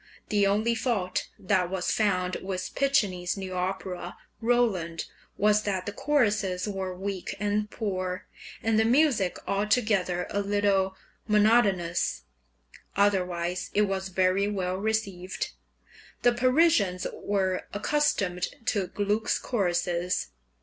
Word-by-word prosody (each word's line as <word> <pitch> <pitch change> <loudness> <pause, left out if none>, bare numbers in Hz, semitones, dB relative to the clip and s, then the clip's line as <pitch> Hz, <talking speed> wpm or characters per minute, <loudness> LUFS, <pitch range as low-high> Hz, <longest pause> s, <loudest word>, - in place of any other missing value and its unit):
The 205 -1 +3
only 215 +4 +2
fault 220 -6 -1
that 185 -2 +1
was 185 -1 -1
found 185 -4 +1
with 185 -1 -4
Piccinni's 200 -11 +1
new 190 -1 -5
opera 180 -1 -3 0.2
"Roland" 220 -9 +1 0.3
was 210 +1 +4
that 190 -3 -2
the 205 - -3
choruses 210 -8 +1
were 190 -2 -3
weak 195 -1 -4
and 210 +1 0
poor, 185 -4 -3 0.4
and 225 -1 +3
the - - +5
music 240 - +3
altogether 200 -4 +1
a 200 - 0
little 200 -1 +1 0.3
monotonous; 205 -5 +3 0.7
otherwise 180 -3 +1
it 210 - +5
was 195 -1 -2
very 185 +2 +2
well 185 -3 -1
received. 195 -3 -2 0.7
The 245 - +5
Parisians 255 - +3
were 190 -2 -1
accustomed 205 -7 0 0.2
to 195 -3 -1
Gluck's 205 +3 0
choruses. 180 -4 -1
195 Hz, 115 wpm, -27 LUFS, 185-210 Hz, 0.7 s, the